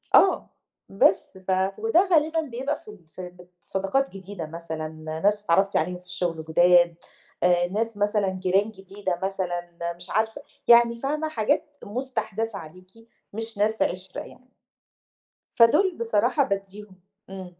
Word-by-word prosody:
آه 385 - +5 0.4
بس 195 -1 +2
ف 190 - +1 0.3
وده 400 -4 +3
غالبًا 320 0 +3
بيبقى 270 0 -3
في 210 - -12
ال 180 -6 -17
في 180 +4 -8
بت 180 0 -18
صداقات 195 +9 -1
جديدة 190 -3 -7
مثلًا، 160 -1 -5 0.4
ناس 205 0 +3
اتعرفتِ 195 +2 +3
عليهم 180 +3 -1
في 180 - -19
الشغل 170 -3 -3
جُداد، 175 +1 +5 0.5
آآ 175 0 +4
ناس 220 +3 -2
مثلًا 205 -1 +1
جيران 190 +3 +1
جديدة 195 -2 -5
مثلًا 175 -3 -2 0.3
مش 175 +1 -12
عارفة، 220 +5 0 0.3
يعني 235 0 +6
فاهمة 300 +4 -1
حاجات 290 +4 -1
مستحدثة 225 -2 -3
عليكِ، 185 +4 -13 0.4
مش 225 0 -6
ناس 215 +2 +1
عِشرة 185 +1 -2
يعني. 255 - -14 1.1
فدول 315 +11 +5
بصراحة 450 - +2
بادّيهم 200 -1 -5 0.3
إمم.. 185 -2 -9
200 Hz, 135 wpm, -25 LUFS, 180-235 Hz, 1.1 s, يعني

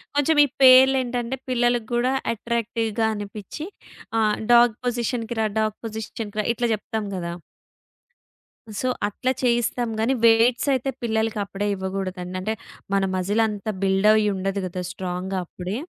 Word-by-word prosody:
కొంచెం 295 +2 +2
ఈ - - -3
పేర్లేంటంటే 255 -1 +5
పిల్లల 240 -1 +2
గూడా 245 +2 +1 0.2
అట్రాక్టివ్‌గా 230 -1 -1
అనిపిచ్చి 205 - -7 0.5
ఆ! - - +3 0.3
డాగ్ 235 -2 +6
పొజిషన్‌కి‌రా, 235 -2 -1
డాగ్ 215 -1 0
పొజిషన్‌కి‌రా 215 -1 -4
ఇట్లా 240 0 -1
జెప్తాం 215 0 -3
గదా! 170 -1 -4 1.5
సో 255 - -1 0.2
అట్లా 255 +5 -1
చేయిస్తాం 240 0 +1
గాని, 240 +4 +2
వెయిట్సయితే 240 +4 +3
పిల్లలకప్పుడే 215 -3 -1
ఇవ్వగూడదండి. 190 -1 -4
అంటే 215 +3 -1 0.4
మన 195 - +2
మజిలంతా 210 +2 0
బిల్డ్ 195 +1 +3
అయుండదు 200 -2 0
గదా! 180 0 -4
స్ట్రాంగ్‌గా 185 +1 -4
అప్పుడే. 185 +5 -5
220 Hz, 115 wpm, -23 LUFS, 195-240 Hz, 1.5 s, డాగ్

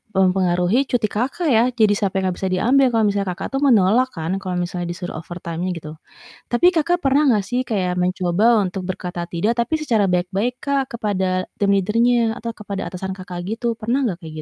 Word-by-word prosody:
mempengaruhi 185 +5 +2
cuti 230 -4 +1
Kakak, 275 +8 -1
ya. 225 -1 +5
Jadi 215 -3 +4
sampe 200 -2 -1
yang 190 - +1
nggak - - -7
bisa 190 - -1
diambil 260 +8 +4
kalau 225 - +3
misalnya 200 -1 -2
Kakak - - -6
tuh 270 - -1
menolak 230 +2 +4
kan, 165 +1 -3
kalau 185 -2 -4
misalnya 175 0 -3
disuruh 175 -1 -5
overtime-nya 175 +1 -5
gitu. 155 -2 -8 0.6
Tapi 240 +9 +4
Kakak 345 +2 +2
pernah 280 0 +2
nggak 205 -3 +1
sih, 250 +3 -1
kayak 185 -7 -1
mencoba 185 +5 +2
untuk 190 -1 -2
berkata 180 -1 -4
tidak, 205 +7 0
tapi 240 +7 0
secara 230 -9 +1
baik-baik, 195 +8 -1
Kak, 275 -2 -1
kepada 185 -3 -1
team 200 -1 +1
leader-nya 230 +3 +2
atau 230 +1 -5
kepada 200 -5 -6
atasan 190 +1 -5
Kakak, 185 -2 -7
gitu, 230 +3 -1
pernah 240 +5 0
nggak 190 -9 -2
kayak 160 -3 -10
200 Hz, 190 wpm, -21 LUFS, 180-240 Hz, 0.6 s, ya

